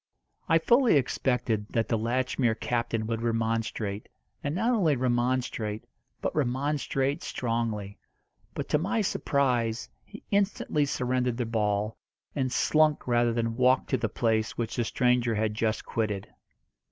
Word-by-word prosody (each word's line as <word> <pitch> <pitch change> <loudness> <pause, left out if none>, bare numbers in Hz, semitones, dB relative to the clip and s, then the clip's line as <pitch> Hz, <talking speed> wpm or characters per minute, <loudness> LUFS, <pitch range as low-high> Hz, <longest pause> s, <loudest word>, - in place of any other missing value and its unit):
I 165 - +6
fully 240 - +4
expected 125 -5 0
that 115 -1 +1
the 115 - +1
Latchmere 120 +1 0
captain 115 -2 -1
would 115 0 -2
remonstrate, 115 -2 -1 0.3
and 145 +2 -2
not 225 +7 +1
only 180 - +3
remonstrate, 120 -3 -1 0.4
but - - -1
remonstrate 140 +1 0
strongly; 115 -4 -3 0.6
but, - - -3
to 150 - +3
my 200 +7 0
surprise, 125 - 0
he 210 - -13
instantly 200 -7 +1
surrendered 125 -2 0
the 125 - -1
ball, 105 -1 -1 0.4
and 130 -3 0
slunk 155 0 +2
rather 120 -1 +3
than 115 -1 -1
walked 130 +1 +3
to 130 - +3
the 115 -2 -1
place 110 0 0
which 115 -2 -2
the 120 - 0
stranger 125 -1 +2
had 105 0 0
just 110 0 -1
quitted. 105 -4 -2
120 Hz, 140 wpm, -28 LUFS, 115-135 Hz, 0.6 s, I